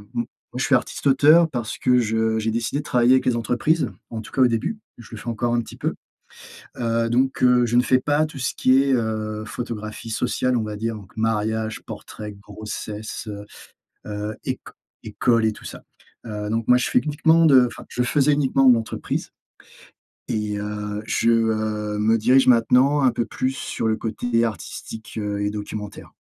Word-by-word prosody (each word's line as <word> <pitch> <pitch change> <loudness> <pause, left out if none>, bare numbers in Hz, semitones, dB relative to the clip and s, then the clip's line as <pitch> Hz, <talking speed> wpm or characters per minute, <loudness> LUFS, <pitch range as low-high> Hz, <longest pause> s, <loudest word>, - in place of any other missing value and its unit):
m 120 - 0 0.3
moi - - -8
je - - +1
suis - - +1
artiste-auteur 150 +5 +4
parce 120 -8 -4
que 125 0 +3
je 110 0 +1
j'ai 110 +1 -1
décidé 115 +4 -1
de 150 - -5
travailler 125 -2 +3
avec 130 - +3
les 125 - +3
entreprises, 125 +8 0 0.2
en 115 - -5
tout - - -12
cas, 135 - 0
au 125 - +7
début, 120 - -2 0.2
je 115 - -13
le 115 - -7
fais - - -12
encore 120 +1 -1
un 120 - +2
petit - - -11
peu. - - -2 0.8
Heu, 115 -1 0
donc 130 +3 +1
heu, 125 -1 +5
je 120 +1 +1
ne - - +6
fais 130 0 +3
pas 150 +2 +1
tout 150 -3 -9
ce 125 - -1
qui 130 +1 +4
est, 140 - 0
heu, 110 -2 -2
photographie 110 -1 -6
sociale, 125 +2 0
on 115 - 0
va 105 -1 -5
dire, 115 +2 -3
donc 100 -3 -13
mariage, 110 0 -1
portrait, 105 -1 -8
grossesse, 105 +2 -7
heu, 105 -1 -7 0.6
heu, 105 +1 -4
éc - - -2 0.4
école 115 -2 +1
et 110 - +2
tout - - -14
ça. - - -9 0.4
Heu, 105 -2 -5
donc 115 0 -1
moi 125 - +6
je 125 - -1
fais - - +2
uniquement 160 +3 +3
de 130 -5 +6
enfin, - - -10
je 125 - -2
faisais 145 +3 +2
uniquement 135 -2 +3
de 125 - +9
l'entreprise, 115 -1 -3 1.0
et 105 -1 -2
heu, 105 0 -4
je, 115 - +1
heu, 110 -2 0
me 110 +2 +3
dirige 130 +4 +4
maintenant 125 +4 +4
un 130 -2 +4
peu 120 0 -1
plus 130 +3 -2
sur 110 - -3
le 110 - +2
côté 115 +1 -1
artistique, 110 0 -7
heu, 105 -1 -2
et 100 - 0
documentaire. 105 0 -7
115 Hz, 195 wpm, -22 LUFS, 110-125 Hz, 1.0 s, de